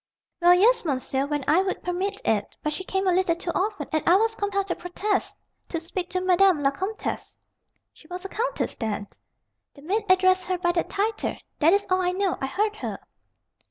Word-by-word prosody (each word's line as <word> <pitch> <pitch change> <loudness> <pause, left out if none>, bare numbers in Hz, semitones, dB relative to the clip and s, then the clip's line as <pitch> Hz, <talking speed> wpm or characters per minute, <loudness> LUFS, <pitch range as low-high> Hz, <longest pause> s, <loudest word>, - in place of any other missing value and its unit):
"Well, 350 +1 +7
yes, 465 +7 +4
monsieur, 270 -2 -1
when 290 -1 -2
I 325 +5 +5
would 380 0 -3
permit 380 +3 -2
it. 210 -2 0
But 300 - -1
she 375 - -4
came 385 +1 -1
a 370 - +4
little 360 -2 +2
too 345 0 -4
often, 405 +2 -1
and 310 - +2
I 350 - +7
was 445 +3 +3
compelled 400 -2 -1
to - - 0
protest, 375 +3 -2 0.3
to 330 - -2
speak 350 +2 -5
to 365 - -1
Madame 370 -3 +4
la 275 - +4
Comtesse 380 +9 -4 0.3
" - - -48
"She 310 - -19
was 360 +2 -7
a - - -4
countess, - - -2
then?" 210 -3 -3 0.7
"The 280 - -15
maid 410 +7 0
addressed 370 0 +4
her 370 -1 0
by 350 0 +1
that 345 -1 -1
title. 425 +3 -1 0.2
That 325 +3 +5
is 405 0 +2
all 370 0 +3
I 360 0 +1
know. 385 -1 0
I 270 - -1
heard 420 +9 -1
her." - - -4
370 Hz, 210 wpm, -25 LUFS, 335-395 Hz, 0.7 s, Well